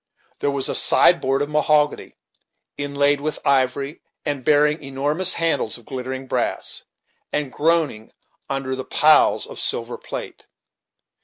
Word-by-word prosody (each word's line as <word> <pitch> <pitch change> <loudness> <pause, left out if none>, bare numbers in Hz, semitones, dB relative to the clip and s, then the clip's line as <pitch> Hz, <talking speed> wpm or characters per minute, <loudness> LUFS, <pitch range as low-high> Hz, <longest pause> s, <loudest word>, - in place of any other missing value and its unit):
There 145 - 0
was 140 -1 0
a - - -1
sideboard 135 +2 +4
of 145 - -5
mahogany, 150 -1 +1 0.6
inlaid 145 0 0
with 155 +1 -3
ivory, 140 +1 0 0.2
and 145 -4 -3
bearing 150 +2 +2
enormous 145 +7 0
handles 165 -9 0
of 120 - -17
glittering 130 0 -6
brass, - - -2 0.5
and 145 -3 -3
groaning 155 -8 0 0.4
under 135 -1 -3
the 130 - -5
piles 155 +3 +3
of - - -8
silver - - 0
plate. - - -8
140 Hz, 130 wpm, -21 LUFS, 135-150 Hz, 0.6 s, sideboard